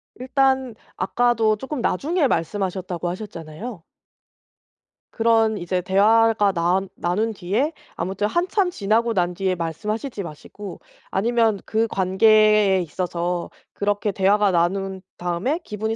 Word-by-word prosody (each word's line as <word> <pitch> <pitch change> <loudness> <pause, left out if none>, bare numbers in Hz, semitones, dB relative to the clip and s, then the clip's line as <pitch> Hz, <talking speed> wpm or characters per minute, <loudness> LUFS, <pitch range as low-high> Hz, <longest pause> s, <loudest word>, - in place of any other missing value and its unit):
일단 265 -1 +1 0.2
아까도 225 +2 +2
쪼끔 265 +3 -5
나중에 305 - +1
말씀하셨다고 185 -2 -2
하셨잖아요. 180 +1 -7 1.3
그런 225 -1 +3
이제 180 0 -2
대화가 210 +3 +4
나 175 +2 +2 0.2
나눈 210 +6 -1
뒤에 215 - -1 0.2
아무튼 190 +4 -1
한참 360 - +1
지나고 230 - +1
난 180 -3 +1
뒤에 185 +1 -1
말씀하시지 210 - -4
마시고 175 +5 -9 0.3
아니면 225 0 +2
그 225 +1 +1
관계에 210 0 +4
있어서 175 +1 -3 0.2
그렇게 205 0 -1
대화가 200 +1 +3
나눈 190 +2 0 0.2
다음에 180 - -1
기분이 220 -1 -3
205 Hz, 285 characters per minute, -22 LUFS, 180-225 Hz, 1.3 s, 대화가